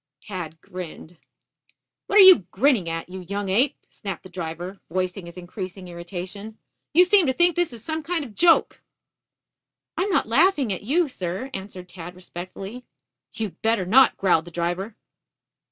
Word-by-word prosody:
Tad 170 -5 -7
grinned. 175 -2 -9 0.9
"What 405 - +2
are 405 - +11
you 370 - +8
grinning 225 - +2
at, 165 0 -4
you 185 +1 -8
young 200 +2 -4
ape?" 245 +9 +2
snapped 195 -5 -7
the 185 - -12
driver, 175 +2 -6
voicing 185 +1 -3
his 170 - -11
increasing 185 +1 -7
irritation. 185 +5 -7 0.3
"You 345 +4 +7
seem 365 -2 +4
to 260 - +2
think 345 +3 +3
this 350 -4 +1
is 230 -2 -10
some 315 +3 -3
kind 325 -1 -2
of 240 - -11
a - - -19
joke." 335 +7 +3 1.1
"I - - -1
am 395 - 0
not 380 - +1
laughing 280 - +3
at 185 - -6
you, 310 +10 +1
sir," 195 +2 -5
answered 190 -2 -7
Tad 175 0 -9
respectfully. 185 +6 -8 0.5
"You'd 210 -7 -5
better 220 -4 +2
not," 260 +8 +5
growled 175 -4 +2
the - - -9
driver. 175 +5 -3
195 Hz, 170 wpm, -24 LUFS, 180-265 Hz, 1.1 s, are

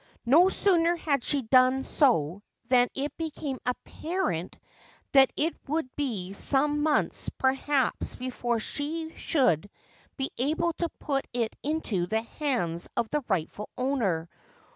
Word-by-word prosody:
No 325 +10 +6
sooner 345 -4 +3
had 285 -6 0
she 285 -3 +1
done 255 +3 +4
so 200 - +2 0.3
than 250 -1 +5
it 280 +2 -3
became 305 -4 -4
apparent 250 - -2 0.5
that 270 -1 +6
it 320 +3 +1
would 295 -3 -2
be 210 -10 -3
some 290 +7 +1
months 300 0 +1
perhaps 270 0 0
before 245 -2 -2
she 320 +7 -3
should 205 - +1 0.5
be 270 -1 -2
able 320 +6 +1
to 340 - 0
put 275 -3 -2
it 235 -2 -1
into 250 - -1
the 220 +4 0
hands 230 - -2
of 235 -2 0
the 295 -1 0
rightful 190 +2 -2
owner. 230 -11 0
265 Hz, 130 wpm, -28 LUFS, 225-300 Hz, 0.5 s, No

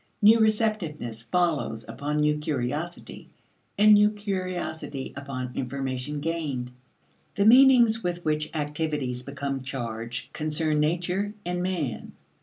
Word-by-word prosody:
New 220 +2 +7
receptiveness 210 - 0
follows 145 -4 -1
upon 145 +7 -3
new 150 0 +3
curiosity, 150 +4 -4 0.5
and 210 +1 +7
new 210 0 +6
curiosity 185 -8 -4
upon 130 -3 -5
information 135 +2 -3
gained. 145 -6 -3 0.6
The 200 - +2
meanings 240 -2 +6
with 175 0 -3
which 155 0 0
activities 150 -4 -2
become 140 0 -4
charged, 120 -3 -5
concern 155 0 0
nature 180 +6 0
and 180 0 -2
man. 170 -10 -3
150 Hz, 110 wpm, -26 LUFS, 135-185 Hz, 0.6 s, New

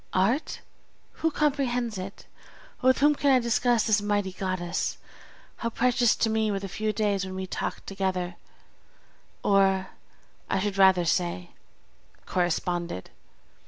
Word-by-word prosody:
Art! 215 - +1 0.6
who 325 - +3
comprehends 255 -8 0
it? 195 +2 -8 0.6
with 260 0 +4
whom 295 +1 +6
can 285 -1 +1
I 265 - +6
discuss 235 0 +2
this 215 -2 +2
mighty 205 -2 0
goddess? 185 -2 -2 0.6
How 230 - -2
precious 240 0 +2
to 225 - +1
me 220 -1 +1
were 200 - 0
the 195 0 -5
few 215 +3 -2
days 205 -2 0
when 190 0 -6
we 190 0 -3
talked - - -4
together, 185 -2 -2 1.1
or, 195 -1 +3 0.6
I - - +1
should 200 0 -2
rather 190 -2 +6
say, 170 - -1 0.7
corresponded! 175 - -2
200 Hz, 130 wpm, -27 LUFS, 185-235 Hz, 1.1 s, whom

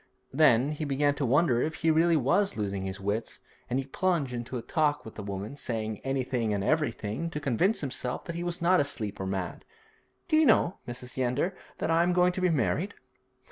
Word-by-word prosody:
Then 140 -2 +4
he 155 +1 -4
began 145 0 +2
to 140 -2 -2
wonder 130 -2 +3
if 155 +3 -1
he 165 -1 +2
was - - +1
really 165 +4 +3
losing 100 -2 -2
his 95 0 -4
wits, 105 +3 -3 0.3
and 125 - 0
he 135 - -1
plunged 155 -3 0
into 120 +1 -4
talk 150 -1 0
with 110 - -9
the - - -7
woman, 100 +5 -5
saying 110 -6 -3
anything 125 -5 -1
and 100 - -2
everything 150 0 -1
to 150 - -4
convince 150 - +1
himself 125 -3 -3
that 170 - -4
he 170 - -4
was 175 -1 -3
not 180 +1 +5
asleep 115 -8 -2
or 95 - -3
mad. 95 -2 -3 0.6
'Do 310 -3 +3
you 315 -2 +5
know, 195 -5 +3
Mrs. 125 +1 -7
Yeander, 130 +8 0 0.2
that - - -1
I 165 +1 +4
am 175 +1 +2
going 180 0 +4
to 185 - -4
be 185 - +3
married?' 165 - 0
140 Hz, 205 wpm, -28 LUFS, 115-165 Hz, 0.6 s, not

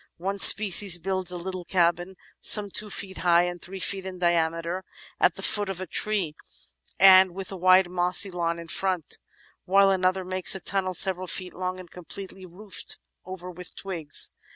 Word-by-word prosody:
One 195 +3 -5
species 200 -3 +7
builds 185 +1 -3
a 180 - -5
little 185 +1 -7
cabin, 175 +1 -1 0.3
some 205 -2 +4
two 210 +2 -2
feet 190 -1 -6
high 175 -1 +2
and 175 -1 -6
three 190 +2 -10
feet 195 +1 -3
in 190 -1 -9
diameter, 170 +1 -2 0.4
at - - +2
the - - -8
foot 205 -2 -1
of 190 -2 -6
a 185 - -6
tree 195 -6 -2 0.7
and 185 -1 +6
with 195 0 -8
a - - -7
wide 185 0 +3
mossy 180 +2 +3
"lawn" 170 -1 -3
in 170 0 -11
front, 185 -1 -4 0.5
while 195 +1 +3
another 185 0 -1
makes 185 +1 0
a - - -6
tunnel 185 0 -3
several 185 0 -1
feet 185 0 -5
long 185 0 -5
and 180 -2 -14
completely 185 +1 -11
roofed 190 +3 -3 0.3
over 180 -1 -9
with 180 0 -12
twigs. 165 -7 -1
185 Hz, 175 wpm, -24 LUFS, 175-190 Hz, 0.7 s, species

